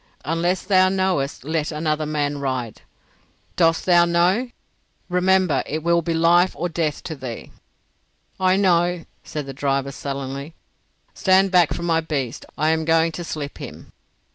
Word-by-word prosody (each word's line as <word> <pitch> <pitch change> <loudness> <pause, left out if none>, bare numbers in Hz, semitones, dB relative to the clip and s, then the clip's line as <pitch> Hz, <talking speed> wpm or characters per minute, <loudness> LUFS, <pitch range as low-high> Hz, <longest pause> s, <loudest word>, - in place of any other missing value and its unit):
"Unless 170 +4 0
thou 185 -1 +4
knowest 185 -9 -1
let 155 +1 -2
another 155 0 -1
man 145 -1 -1
ride. 130 -5 -3 0.7
Dost 165 -2 +2
thou 175 -2 +5
know? 175 +8 +2 0.6
Remember 180 -1 +2
it 155 +1 -3
will 170 0 +3
be 165 0 -2
life 170 +2 +4
or 175 - -2
death 160 -3 -2
to 160 - -5
thee." 130 -5 -8 0.9
"I 185 0 +3
know," 175 -3 +2 0.2
said 150 -2 -5
the 135 - -7
driver, 140 0 -1
sullenly. 140 +2 -6 0.6
"Stand 190 0 +3
back 175 -4 +4
from 170 - -3
my 165 -1 +2
beast. 140 -5 -4
I 155 +2 +2
am 160 0 +1
going 165 +1 +2
to 175 - -6
slip 150 -3 -6
him." - - -10
165 Hz, 150 wpm, -22 LUFS, 145-180 Hz, 0.9 s, thou